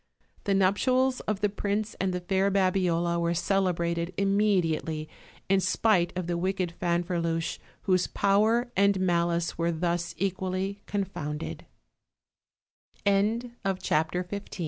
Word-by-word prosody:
The 200 - +2
nuptials 255 +7 +2
of 210 -2 -1
the 205 - +3
prince 205 +1 -2
and 190 -1 +1
the 180 0 -3
fair 190 +2 +1
Babi 190 -1 +2
ola 170 0 +1
were 170 0 0
celebrated 170 -2 0
immediately, 185 -6 +1 0.4
in 195 0 +4
spite 185 -1 +2
of 185 - -2
the 170 0 -1
wicked 185 -1 -1
Fanferluche, 170 -2 -1 0.2
whose 185 -2 +2
power 220 +5 +2
and 200 0 +3
malice 170 -2 0
were 170 +1 +1
thus 170 0 -1
equally 190 +1 -2
confo 160 -7 -3
185 Hz, 110 wpm, -28 LUFS, 170-200 Hz, 0.4 s, in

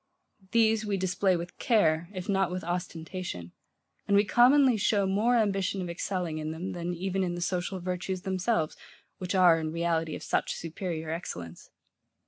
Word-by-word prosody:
These 220 0 +3
we 205 -2 -1
display 185 0 +1
with 170 +1 -8
care, 170 -8 +2
if 185 -3 -6
not 195 -2 +2
with 185 0 -4
ostentation; 170 - -5 0.6
and 200 - +4
we 205 - +4
commonly 255 +4 +5
show 205 -1 +2
more 210 +6 +2
ambition 195 -3 +1
of 180 -2 -3
excelling 175 -2 -3
in 155 0 -3
them, 165 +4 -4
than 175 0 -3
even 190 +2 -1
in 175 -1 -2
the - - -5
social 180 +1 -2
virtues 180 +1 -3
themselves, 185 -3 0 0.4
which 185 +1 -3
are, 175 -3 +6
in 155 -1 -3
reality, 165 -1 -1
of - - -8
such - - 0
superior 165 -1 -4
excellence. 90 - -6
180 Hz, 165 wpm, -29 LUFS, 170-195 Hz, 0.6 s, are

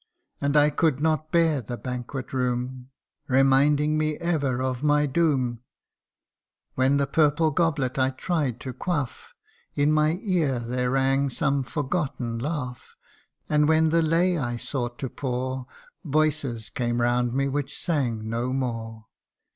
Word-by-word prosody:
And 140 +1 +2
I 150 0 +5
could 150 -2 +1
not 155 0 0
bear 165 -5 +3
the 120 +2 -6
banquet 125 +2 -6
room, 125 0 -2 0.4
Reminding 145 +3 +3
me 155 0 0
ever 145 -7 -1
of 130 -1 -2
my 150 0 +3
doom; 135 -5 +1 1.1
When 130 +2 +2
the 140 - +2
purple 155 +2 +2
goblet 140 -5 0
I 130 0 +3
tried 135 -2 -2
to 130 - -5
quaff, 145 -2 -4 0.4
In 145 +1 +3
my 155 +2 +2
ear 170 - +1
there 125 +1 -2
rang 135 +1 +2
some 140 +1 0
forgotten 135 -4 -2
laugh; 125 -3 -5 0.5
And 150 -1 +3
when 160 0 +4
the 165 +1 +3
lay 170 +2 +2
I 120 -3 -2
sought 120 -1 -4
to 135 - -3
pour, 130 0 -3 0.4
Voices 145 - 0
came 120 0 -1
round 120 0 +1
me 135 0 +1
which 140 0 -3
sang 120 -10 -1
no 120 +3 -2
more. 115 -4 -3
135 Hz, 140 wpm, -25 LUFS, 125-155 Hz, 1.1 s, I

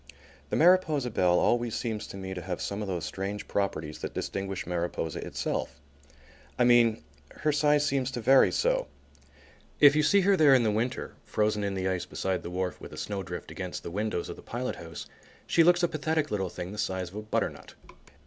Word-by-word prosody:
The - - -1
Mariposa 160 -7 +4
Belle 90 -3 +3
always 120 +2 +1
seems 110 -3 -3
to - - -8
me 95 -1 -5
to 90 - -5
have 90 0 -4
some 100 +1 -3
of 105 - -3
those 90 -4 -3
strange 100 +1 -4
properties 80 -6 -2
that - - -6
distinguish 95 -1 -3
Mariposa 85 -2 -3
itself. - - -3 0.8
I 125 - +3
mean, 120 -2 +4 0.3
her 155 - -1
size 150 0 +3
seems 135 -3 0
to 130 -2 -4
vary 130 +4 +5
so. - - +1 0.9
If 145 0 +8
you 155 - +4
see 200 +6 +4
her 195 +1 +4
there 150 -6 +6
in 125 - +4
the 110 - +2
winter, 115 +4 -2
frozen 105 -1 0
in 100 -1 -2
the 95 0 -1
ice 95 -1 -2
beside 95 -1 -2
the - - -6
wharf 90 0 -3
with - - -9
a - - -9
snowdrift 95 -4 -5
against 90 -2 -6
the - - -6
windows 105 -2 -2
of - - -7
the - - -11
pilot 125 +2 -4
house, 80 -2 -8 0.4
she 165 - +4
looks 175 +1 +4
a - - +5
pathetic 155 -1 -1
little 95 -3 -1
thing 90 +1 -6
the 105 - -7
size 95 -2 -2
of - - -14
a - - -3
butternut. 110 - -3
105 Hz, 205 wpm, -28 LUFS, 95-140 Hz, 0.9 s, If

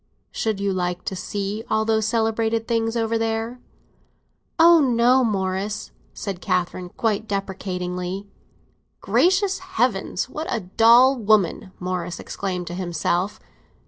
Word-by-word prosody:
"Should 220 -3 -2
you 200 -1 0
like 180 -1 -2
to 190 - -3
see 205 +3 -4
all 220 0 +1
those 220 -1 +1
celebrated 225 0 0
things 225 0 0
over 225 0 0
there?" 225 +2 -2 1.0
"Oh 335 0 +7
no, 250 -1 +4
Morris!" 195 -1 -2 0.2
said 195 -3 -6
Catherine, 180 -1 -1
quite 220 +2 -1
deprecatingly. 185 -1 -4 0.7
"Gracious 385 +2 +2
Heaven, - - -1
what 310 +2 -5
a 225 - -1
dull 235 +7 +5
woman!" 210 -5 +2
Morris 180 -1 -3
exclaimed 180 -3 -4
to 175 - -6
himself. 175 +2 -1
210 Hz, 120 wpm, -23 LUFS, 185-230 Hz, 1.0 s, Oh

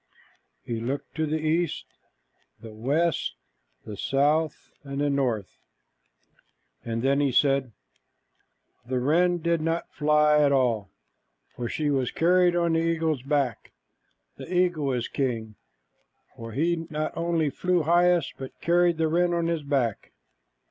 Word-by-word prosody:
He 115 -1 -4
looked 130 +4 -4
to 155 +2 -1
the 155 +1 0
east, 160 +1 -1 0.7
the 110 -2 -11
west, 145 +10 0 0.5
the 105 - -7
south, 150 +8 0
and 140 -1 -5
the 145 0 +1
north, 120 -8 -2 1.2
and 115 0 -3
then 140 +1 +2
he 140 -2 +2
said, 135 -1 +2 1.1
"The 125 +2 -2
wren 175 +7 +2
did 170 -1 +1
not 165 +1 -2
fly 150 0 +3
at 145 -1 +4
all, 120 -7 +1 0.7
for 120 -1 -4
she 150 -2 -1
was 130 -3 0
carried 180 +1 +3
on 170 -1 +1
the 165 - +2
eagle's 165 -4 0
back. 140 -3 -2 0.6
The - - -9
eagle 175 -6 +1
is 120 -2 -2
king, 115 -5 -3 0.8
for 115 -1 -8
he 165 +4 0
not 155 0 -3
only 165 -3 0
flew 180 +3 0
highest, 175 0 +3
but 135 -1 -9
carried 175 0 +2
the 160 0 +1
wren 175 +2 +1
on 170 -1 0
his 165 -1 -1
back." 135 -7 -2
150 Hz, 140 wpm, -26 LUFS, 130-165 Hz, 1.2 s, at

